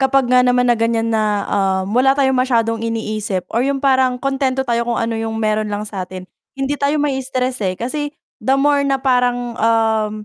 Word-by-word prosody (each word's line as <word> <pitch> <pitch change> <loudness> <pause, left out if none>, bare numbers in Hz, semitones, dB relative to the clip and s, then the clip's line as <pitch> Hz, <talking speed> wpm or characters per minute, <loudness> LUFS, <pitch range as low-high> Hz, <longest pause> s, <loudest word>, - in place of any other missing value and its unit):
kapag 265 -1 +2
nga 250 0 +4
naman 250 0 +2
na 240 - +4
ganyan 230 0 0
na, 210 -2 0
ah, 190 -1 +1
wala 255 +5 +3
tayong 265 -2 +2
masyadong 230 -3 +1
iniisip 215 -4 -3
or 235 +3 +1
'yung 275 0 -1
parang 260 -2 +2
kuntento 270 -1 0
tayo 235 -1 0
kung 235 - 0
ano 230 0 -1
'yung 225 0 -3
meron 215 0 0
lang 205 +1 -3
sa'tin, 185 -2 -7 0.3
hindi 270 +1 -1
tayo 285 +1 0
ma-iistress, 260 -3 -2
eh, 185 -1 0
kasi 290 +6 -3 0.3
the 265 - +1
more 285 +1 +3
na 270 -1 0
parang, 245 -2 0
um, 220 -1 +2
245 Hz, 190 wpm, -18 LUFS, 220-265 Hz, 0.3 s, nga